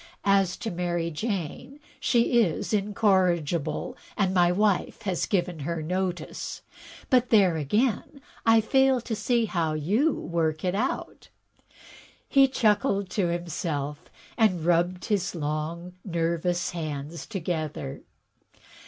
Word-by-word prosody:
As 195 -2 +3
to 225 - -4
Mary 175 -1 -2
Jane, 200 - -4 0.2
she 240 0 +3
is 180 +1 -1
incorrigible, 185 -7 +1 0.2
and 190 -2 +1
my 175 -1 +4
wife 205 +2 0
has 185 -5 -1
given 175 -4 -1
her 160 +2 -3
notice; 180 -1 -3 0.5
but 250 -1 +4
there, 195 -6 +5
again, 220 - 0 0.2
I 225 0 +5
fail 265 +3 +3
to 225 -1 -3
see 230 +2 +1
how 165 -6 -1
you 205 - +2
work 160 -1 -1
it 180 - +1
out.*' 225 +7 -3 1.0
He 275 -1 +5
chuckled 210 -5 +1
to 195 -5 +1
himself 160 -4 -3 0.3
and 185 -7 +3
rubbed 175 +1 +1
his 195 -4 -1
long, 160 +3 -3
nervous 170 0 -1
hands 155 -1 -5
together. 160 - -4
180 Hz, 120 wpm, -26 LUFS, 165-210 Hz, 1.0 s, there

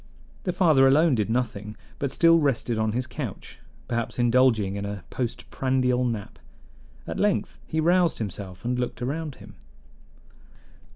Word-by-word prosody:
The 180 - +1
father 160 -7 +5
alone 150 +3 +5
did 110 -3 0
nothing, 110 -3 -2 0.2
but 140 - -1
still 165 0 +5
rested 125 -6 0
on 110 -1 0
his 125 +2 -1
couch, 125 -4 -7 0.3
perhaps 120 -2 -2
indulging 120 -5 +3
in 100 - -4
a 100 -2 -5
postprandial 125 +1 -1
nap. 115 -5 -4 0.7
At - - -5
length - - 0
he 160 - -1
roused 175 +1 +3
himself 100 -2 -6
and 125 +1 0
looked 125 0 -3
around 150 +2 -3
him. - - -14
125 Hz, 140 wpm, -25 LUFS, 110-140 Hz, 0.7 s, father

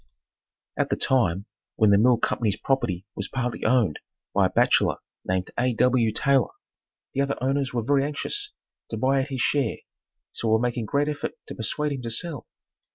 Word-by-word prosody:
At - - +1
the - - +1
time 100 -7 +1 0.3
when 110 -2 +4
the 100 - +6
Mill 120 +2 +5
Company's 110 -2 0
property 100 -9 -1
was - - -3
partly 125 -2 -3
owned 110 -9 +2 0.3
by - - +4
a - - -7
bachelor - - +3 0.3
named 95 0 -1
A. 125 -1 +1
W. 125 -1 +3
Taylor, 135 +1 +2 0.6
the 140 - +1
other 140 0 0
owners 135 +1 0
were 120 -2 -1
very 140 +3 +3
anxious 405 - -3 0.4
to 110 - -4
buy 135 +4 +2
out 135 - -3
his 135 -3 -3
share 135 -5 +1 0.5
so 115 - -3
were 110 0 +4
making 120 0 -1
great 140 +7 +1
effort 150 -1 -3
to - - -7
persuade 150 +6 -1
him 135 -2 -3
to 120 - -4
sell. 145 +4 -3
125 Hz, 180 wpm, -25 LUFS, 110-140 Hz, 0.6 s, the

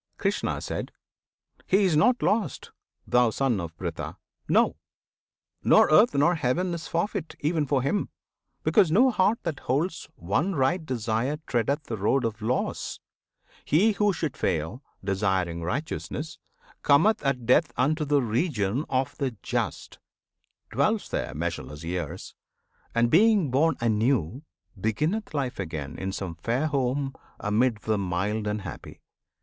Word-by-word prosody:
Krishna. - - -1 1.1
He 195 +2 +4
is 180 -5 +3
not 240 +11 +3
lost, 215 0 0 0.3
thou 125 -1 +4
Son 120 -2 0
of 85 -1 -7
Pritha! 80 -3 -5 0.3
No! - - +3 0.9
Nor - - +5
earth, 210 +6 +6
nor 150 +5 +4
heaven 170 +4 0
is 170 -1 -5
forfeit, 170 0 -2
even 155 -1 0
for 135 -2 +1
him, 145 +10 0 0.5
Because 200 -7 +4
no 250 +9 +5
heart 210 +1 +2
that 155 -5 -3
holds 160 +7 -2
one 145 - -1
right 160 +6 +1
desire 125 +1 -1
Treadeth 140 +5 0
the 115 -5 -5
road 115 +6 +1
of 110 -1 -3
loss! 120 +4 -2 0.6
He 195 +9 +4
who 210 0 +2
should 165 -6 -3
fail, 85 - -2 0.2
Desiring 95 -3 0
righteousness, 150 - -4 0.4
cometh 160 +10 +4
at 130 -4 0
death 140 +7 +4
Unto 155 +5 +2
the 145 -2 +2
Region 120 - 0
of 130 0 0
the 130 -5 -2
Just; - - -3 0.7
dwells - - +1
there - - -3
Measureless 80 -1 -4
years, 85 -2 -4 0.6
and 115 0 +3
being 200 - +4
born 150 +4 +3
anew, 115 - +1 0.4
Beginneth 155 - -1
life 135 -6 -2
again 75 -7 -5
in 95 0 -3
some 95 -3 -4
fair 115 - -1
home 135 -1 0 0.3
Amid 110 +1 +1
the 110 -2 0
mild 100 +3 -1
and 105 -1 -2
happy. 95 - -9
130 Hz, 135 wpm, -26 LUFS, 105-160 Hz, 1.1 s, earth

